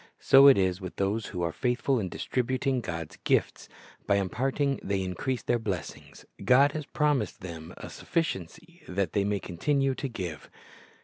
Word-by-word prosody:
So 135 +1 +7
it 135 - +8
is 95 -1 +1
with 95 -1 -7
those 100 +3 -1
who 90 -4 -4
are 85 - 0
faithful 125 - 0
in 95 -4 -3
distributing 130 +3 -1
God's 85 -7 -6
gifts. - - 0 0.4
By 100 - +4
imparting 135 +8 0
they 100 -1 -1
increase 95 +8 -3
their 120 - +1
blessings. 100 -5 -6 0.2
God 140 +3 +5
has 150 0 -5
promised 150 -3 0
them 80 -3 -8
a - - -8
suffi 165 - -1
ciency 160 - -8
that 90 -3 -2
they 100 - +2
may 100 0 0
continue 135 - 0
to 135 - -4
give. 90 -9 -6
110 Hz, 170 wpm, -28 LUFS, 95-135 Hz, 0.4 s, it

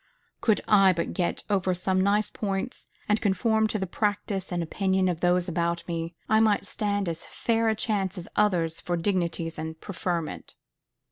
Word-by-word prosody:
"Could 220 -3 +3
I 195 -3 +6
but 170 -1 -2
get 175 -2 -1
over 190 -3 +1
some 185 +1 +1
nice 205 +2 +2
points, 200 +4 -3 0.2
and 210 +1 +2
conform 220 +2 +2
to 215 - -1
the 190 - -2
practice 200 0 -2
and 175 -1 0
opinion 190 +2 +1
of 175 -3 -1
those 175 +1 +2
about 170 0 -1
me, 165 0 -3
I 220 +1 +4
might 215 -2 +3
stand 205 -1 -1
as 165 -1 -3
fair 230 -1 +1
a 220 - +1
chance 205 -4 -1
as 175 - -6
others 175 -6 +2
for 175 -1 -1
dignities 170 -3 -1
and 160 0 -5
preferment." 175 -4 -4
190 Hz, 175 wpm, -27 LUFS, 170-210 Hz, 0.2 s, I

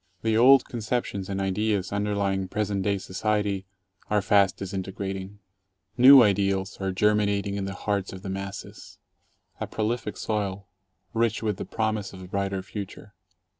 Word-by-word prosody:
The 110 -1 +2
old 130 +4 +7
conceptions 110 -4 -3
and 100 0 -2
ideas 100 0 0
underlying 100 -2 0
present 100 0 -1
day 100 +1 +1
society 100 0 -1 0.4
are 105 - +3
fast 100 -2 +3
disintegrating. 95 0 -5 0.6
New 130 +1 +9
ideals 100 -1 +1
are 95 0 0
ger 105 +3 +3
minating 100 -1 0
in 100 -1 -2
the 95 0 -5
hearts 100 -2 -2
of 95 0 -9
the 95 - -5
masses 95 +1 -7 0.3
— - - -40
a - - -2
prolific 110 -1 -2
soil, 100 -2 -3 0.5
rich 115 -1 0
with 105 -3 -1
the - - -5
promise 110 -3 -2
of 95 -1 -10
a - - -9
brighter 100 0 -2
future. 100 +1 -8
100 Hz, 155 wpm, -26 LUFS, 95-105 Hz, 0.6 s, New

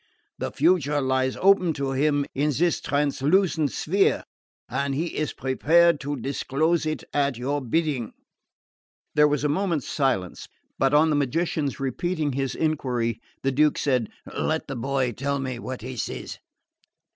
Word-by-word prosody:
The - - -3
future 150 -2 +2
lies 130 -1 0
open 185 -3 +4
to 140 -2 -2
him 145 +1 +1
in 145 +2 +1
this 170 +1 +1
translucent 150 +3 +1
sphere 195 +5 +1 0.4
and 135 +2 -1
he 165 +4 -2
is 155 - -1
prepared 160 +5 +3
to 145 +1 -3
disclose 140 +5 0
it 155 - -3
at 140 -3 +1
your 140 +4 -1
bidding." 135 -2 -1 1.0
There 150 0 +5
was 150 -1 0
a - - +3
moment's 165 -1 -1
silence; 115 - -1 0.3
but 135 +2 +3
on 155 +1 +5
the - - +2
magician's 145 +1 -1
repeating 150 +3 -1
his 135 0 -2
enquiry 125 -7 -1 0.2
the 135 - +2
Duke 150 +2 +3
said: 125 -6 +1 0.3
"Let 160 0 -1
the 135 - -4
boy 130 +1 0
tell 140 +4 -2
me 130 -3 -4
what 130 0 -6
he 130 +1 -6
sees." - - -5
145 Hz, 150 wpm, -25 LUFS, 130-155 Hz, 1.0 s, There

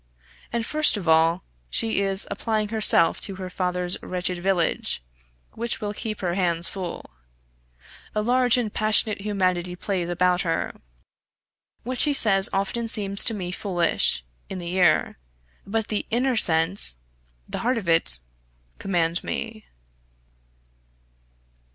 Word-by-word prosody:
And 235 -1 -2
first 305 -3 +4
of 185 -4 -7
all, 165 +2 +2 0.3
she 225 - 0
is 195 0 +1
applying 215 -2 -2
herself 215 -6 +3
to 195 - 0
her 185 -1 -8
father's 180 0 -2
wretched 180 0 -3
village, 175 - 0 0.5
which 235 +1 -2
will 210 -2 -4
keep 215 0 -6
her 175 -2 -2
hands 170 -2 +1
full. 180 - -8 1.0
A 210 - 0
large 250 +1 +2
and 225 -4 -3
passionate 215 -1 +2
humanity 185 -3 -2
plays 180 -2 -3
about 180 +1 +1
her. 165 -1 -2 1.1
What 250 +1 -5
she 295 - +2
says 195 -7 +7
often 200 +4 -2
seems 200 -3 +2
to 225 - +2
me 180 -3 -5
foolish 175 - -1 0.2
in 190 - -6
the 175 -1 -6
ear; 175 - +1 0.5
but 220 +1 -3
the 210 - -2
inner 250 +2 0
sense, 165 - +3 0.5
the - - -6
heart 245 +1 -1
of 205 -6 -6
it, 165 - +4 0.6
command 175 -3 -1
me. 225 -2 -6
195 Hz, 130 wpm, -23 LUFS, 175-220 Hz, 1.1 s, says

